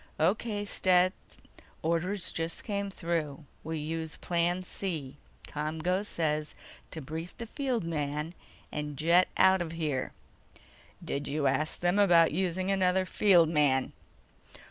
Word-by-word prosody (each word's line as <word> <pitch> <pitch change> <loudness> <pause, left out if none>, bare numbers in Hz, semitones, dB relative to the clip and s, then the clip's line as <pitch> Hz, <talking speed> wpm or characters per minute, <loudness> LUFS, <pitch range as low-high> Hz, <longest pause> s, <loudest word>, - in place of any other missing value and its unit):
"O.K., 205 +5 +1
Stet. 185 -2 +3 0.7
Orders 175 +4 0
just 165 0 -3
came 200 -2 -2
through. 165 -5 -3 0.2
We 160 +1 -3
use 160 +1 -4
Plan 175 +1 0
C. 155 -8 -4 0.3
ComGO 160 +6 -1
says 155 -6 -1 0.3
to 160 - -6
brief 160 +5 -6
the 235 - -5
field 250 - -2
man, 150 0 -2 0.4
and 150 -1 -4
jet 170 +4 +4
out 190 -1 +5
of 165 -1 -4
here." 150 -6 -2 0.9
"Did 140 - -3
you 145 0 -1
ask 140 +3 0
them 175 +3 +2
about 170 -5 +6
using 185 +3 0
another 190 -1 +2
field 180 -4 +4
man?" 145 -5 +2
165 Hz, 125 wpm, -30 LUFS, 155-185 Hz, 0.9 s, about